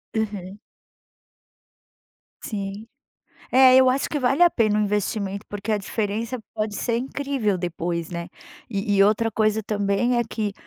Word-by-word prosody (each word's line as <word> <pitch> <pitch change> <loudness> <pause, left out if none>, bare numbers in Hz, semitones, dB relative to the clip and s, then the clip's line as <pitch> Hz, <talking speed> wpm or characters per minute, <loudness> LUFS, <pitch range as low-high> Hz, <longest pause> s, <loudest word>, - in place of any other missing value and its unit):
Aham. 205 -2 -3 1.8
Sim. 200 +1 -5 0.7
É, 260 0 +7
eu 260 -1 +6
acho 270 +2 0
que 295 - -2
vale 270 +6 +2
a 350 - +8
pena 215 -5 +2
o - - +2
investimento, 205 0 -2
porque 205 +1 -5
a 215 - +3
diferença 220 +4 -3 0.2
pode 215 -1 -2
ser 235 -2 -1
incrível 265 -5 -1
depois, 170 -1 -3
né. 170 0 -5 0.4
E 205 0 -1
e 195 - +6
outra 220 +2 +2
coisa, 215 0 +1
também, 205 +4 0
é - - +3
que 215 -2 -2
215 Hz, 145 wpm, -23 LUFS, 200-235 Hz, 1.8 s, a